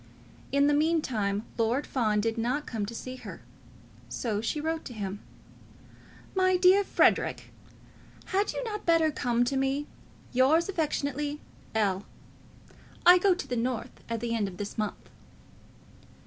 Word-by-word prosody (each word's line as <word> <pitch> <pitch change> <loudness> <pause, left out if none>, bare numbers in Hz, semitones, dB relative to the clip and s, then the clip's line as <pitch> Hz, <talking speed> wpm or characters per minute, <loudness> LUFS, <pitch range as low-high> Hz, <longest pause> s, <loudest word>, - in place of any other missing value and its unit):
In 280 +1 +4
the 295 - +4
meantime, 255 -10 +1
Lord 235 +5 +1
Fawn 215 -5 +1
did 225 +1 0
not 250 +6 -1
come 215 -4 -3
to 235 - -7
see 255 +2 -6
her. - - -10 0.7
So 215 -4 -2
she 265 +7 -2
wrote 320 +1 -2
to 250 - -7
him. 200 -1 -4 1.1
"My 370 -1 +3
dear 370 +2 +6
Frederic, - - +2 0.7
had 400 +2 0
you - - -4
not 425 -3 -4
better 330 -2 +4
come 240 -3 +1
to 245 +3 -1
me? 270 +2 0 0.5
Yours 275 +7 +4
affectionately, 295 -4 -2 0.4
L. 200 -3 +1 1.0
I 355 +1 +9
go 375 0 +4
to - - -6
the 245 - -2
North 240 0 -2 0.2
at 230 -1 -2
the 235 -1 -2
end 215 -3 0
of 180 -2 -8
this 205 0 -5
month." 215 -2 -4
260 Hz, 150 wpm, -28 LUFS, 225-320 Hz, 1.1 s, I